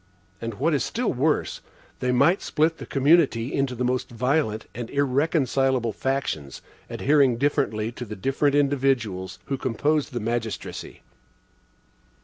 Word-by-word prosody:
And 115 -2 -4
what 165 +10 +1
is 145 - +1
still 240 0 -1
worse, 145 +4 0 0.4
they 125 - 0
might 170 +9 +3
split 160 +1 0
the - - -8
community 140 -4 +3
into 135 -2 0
the 125 - -2
most 125 0 -1
violent 120 -2 0
and 120 0 -6
irreconcilable 135 -4 +1
factions, 130 - -3 0.3
adhering 140 -4 +3
differently 120 -5 0
to 125 +1 -7
the 105 -1 -7
different 135 +7 +1
individuals 125 -10 0
who 135 -2 -3
composed 145 +4 0
the 120 - -3
magistracy. 115 -1 -4
130 Hz, 130 wpm, -25 LUFS, 115-145 Hz, 0.4 s, might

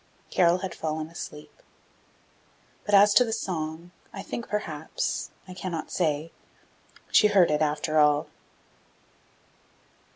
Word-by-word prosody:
Carol 175 0 +4
had 185 - -6
fallen 155 -1 -4
asleep! 160 - -10 1.3
But 205 - +4
as 200 +1 +7
to 250 - +7
the 230 - -4
song, 170 -5 -4 0.2
I 195 - -7
think 235 - -6
perhaps, 160 -7 -3 0.2
I 185 - -8
cannot 175 -3 -5
say, 160 -2 -1 0.8
she 210 - +6
heard 195 -6 +4
it 150 0 +1
after 155 +1 +1
all! 150 +1 +4
170 Hz, 120 wpm, -26 LUFS, 155-195 Hz, 1.3 s, as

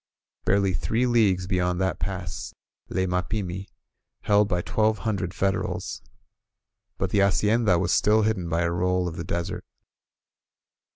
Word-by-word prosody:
Barely 100 -1 +2
three 110 +9 0
leagues 105 -7 +3
beyond 90 -1 0
that 95 -3 0
pass 90 -1 -5 0.3
lay 95 - 0
Mapimi, 90 +1 -2 0.6
held 105 0 +4
by 90 -2 -1
twelve 110 0 +1
hundred 100 -5 -1
Federals. 95 0 -2 1.0
But - - -2
the 100 - +2
hacienda 105 0 +3
was 90 0 0
still 110 +1 +4
hidden 95 -6 0
by 85 +1 +1
a 85 - 0
roll 90 +1 +1
of 85 - -5
the 85 - -4
desert. 85 0 -3
95 Hz, 135 wpm, -25 LUFS, 90-105 Hz, 1.0 s, held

